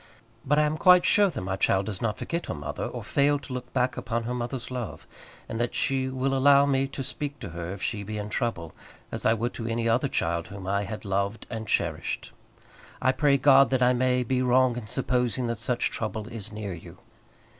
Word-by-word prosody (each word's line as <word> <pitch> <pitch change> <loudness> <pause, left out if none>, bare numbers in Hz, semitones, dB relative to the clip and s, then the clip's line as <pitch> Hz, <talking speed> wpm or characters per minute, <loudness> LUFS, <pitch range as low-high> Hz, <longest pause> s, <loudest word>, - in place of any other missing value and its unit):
But 145 +2 +2
I 150 - +5
am 150 +1 0
quite 180 +1 +6
sure 205 -2 +5
that 150 - -5
my 95 +1 -2
child 95 0 +2
does 100 -3 -5
not 110 -3 -1
forget 170 +1 -3
her - - -3
mother, 75 -2 -4
or - - -6
fail 145 +1 +2
to 140 -2 -9
look 125 0 -6
back 125 +1 0
upon 115 0 -2
her 120 +2 -3
mother's 125 +1 -4
love; 125 -5 -5 0.4
and 115 - -3
that 120 - -2
she 130 -1 0
will 130 +1 -1
allow 140 +1 +6
me 135 -1 +1
to 135 0 -5
speak 145 +2 -4
to 95 - -6
her 85 +1 -5
if 100 0 -7
she 105 -3 -2
be 105 +2 -5
in 105 0 -4
trouble, 110 -10 -2 0.4
as - - -1
I 110 - +4
would 120 +2 -2
to 115 - -5
any 115 0 -1
other 120 +5 +2
child 85 -8 -1
whom 100 -1 -9
I 100 +1 0
had 105 +2 -7
loved 100 +2 -1
and 110 -2 -5
cherished. - - -1 0.7
I 130 - +3
pray 140 +1 +3
God 135 0 +6
that 130 -1 +2
I 125 +1 +5
may 125 0 +2
be 125 +1 0
wrong 130 -1 +3
in 120 -3 -6
supposing 125 0 0
that 115 -2 -2
such 120 +1 0
trouble 110 -1 -3
is 110 -3 -7
near 105 -3 -5
you. 85 - -11
120 Hz, 225 wpm, -27 LUFS, 105-135 Hz, 0.7 s, quite